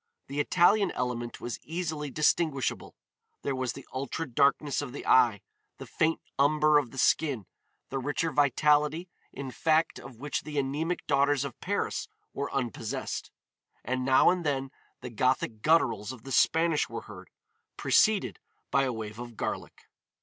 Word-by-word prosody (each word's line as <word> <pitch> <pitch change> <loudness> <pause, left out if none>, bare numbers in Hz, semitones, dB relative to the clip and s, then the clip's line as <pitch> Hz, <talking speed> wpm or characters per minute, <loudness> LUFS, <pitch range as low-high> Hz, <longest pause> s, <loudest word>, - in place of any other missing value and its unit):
The 140 +2 -5
Italian 185 +6 +4
element 120 -1 -3
was 120 - -5
easily 160 -3 -4
distinguishable. 150 -2 0 0.5
There 140 - -1
was 130 -2 -2
the 135 - -10
ultra 140 +5 -3
darkness 140 +2 +2
of 135 -4 -6
the 145 - -7
eye, 120 -6 +4 0.4
the - - -8
faint 160 +1 0 0.2
umber 150 +1 +5
of 135 -5 -4
the 135 - -12
skin, 135 -6 +2 0.4
the 135 - -2
richer 145 +4 -1
vitality, 150 +4 +2 0.2
in 135 -1 -6
fact, 160 +3 +1
of 135 - -11
which 145 +5 -3
the 150 -1 -7
anemic 150 +6 -1
daughters 140 -1 +2
of 135 - -8
Paris - - -2 0.3
were 140 +1 -3
unpossessed. 125 -6 -3 0.5
And 130 +2 -2
now 130 +5 +5
and 180 -1 -2
then 135 -3 -1 0.3
the 125 - -7
Gothic 120 -2 0
gutturals 120 -9 +2
of 130 -4 -11
the 135 - -8
Spanish 160 +2 +3
were - - -5
heard, - - -12 0.5
preceded 215 -3 +3 0.3
by 135 0 +3
a 130 - -1
wave 110 -1 -6
of 120 -2 -8
garlic. - - -5
140 Hz, 155 wpm, -29 LUFS, 130-155 Hz, 0.5 s, umber